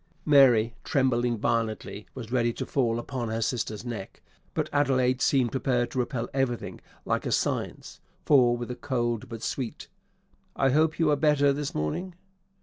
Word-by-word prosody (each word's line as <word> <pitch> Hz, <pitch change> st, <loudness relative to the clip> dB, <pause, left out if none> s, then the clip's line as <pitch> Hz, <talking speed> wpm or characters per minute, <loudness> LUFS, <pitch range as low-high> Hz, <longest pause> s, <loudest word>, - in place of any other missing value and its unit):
_ -, -, -39 dB, 0.2 s
Mary, 125 Hz, -6 st, +5 dB
trembling 125 Hz, -4 st, +1 dB
violently, 110 Hz, -1 st, -2 dB
was 120 Hz, -3 st, -8 dB
ready 120 Hz, -2 st, +2 dB
to -, -, -5 dB
fall 120 Hz, -4 st, 0 dB
upon 120 Hz, -1 st, -4 dB
her 110 Hz, +1 st, -2 dB
sister's 115 Hz, -1 st, -2 dB
neck, 110 Hz, -5 st, -7 dB, 0.3 s
but -, -, 0 dB
Adelaide 130 Hz, -3 st, +2 dB
seemed 130 Hz, -4 st, +2 dB
prepared 125 Hz, -2 st, 0 dB
to 130 Hz, -, -2 dB
repel 125 Hz, -1 st, -2 dB
everything 130 Hz, -3 st, -2 dB, 0.2 s
like -, -, -1 dB
a -, -, -1 dB
_scènce -, -, -2 dB, 0.3 s
_for, 125 Hz, -4 st, +5 dB
with 120 Hz, +1 st, -5 dB
a -, -, -4 dB
cold, 120 Hz, -3 st, -2 dB
but 115 Hz, -1 st, -7 dB
sweet, 130 Hz, +2 st, -4 dB, 0.7 s
"I 135 Hz, -1 st, +2 dB
hope 155 Hz, +3 st, +2 dB
you 160 Hz, -2 st, +3 dB
are -, -, +4 dB
better 145 Hz, -1 st, +3 dB
this 145 Hz, 0 st, -4 dB
morning?" 170 Hz, -, -3 dB
125 Hz, 165 wpm, -27 LUFS, 115-140 Hz, 0.7 s, Mary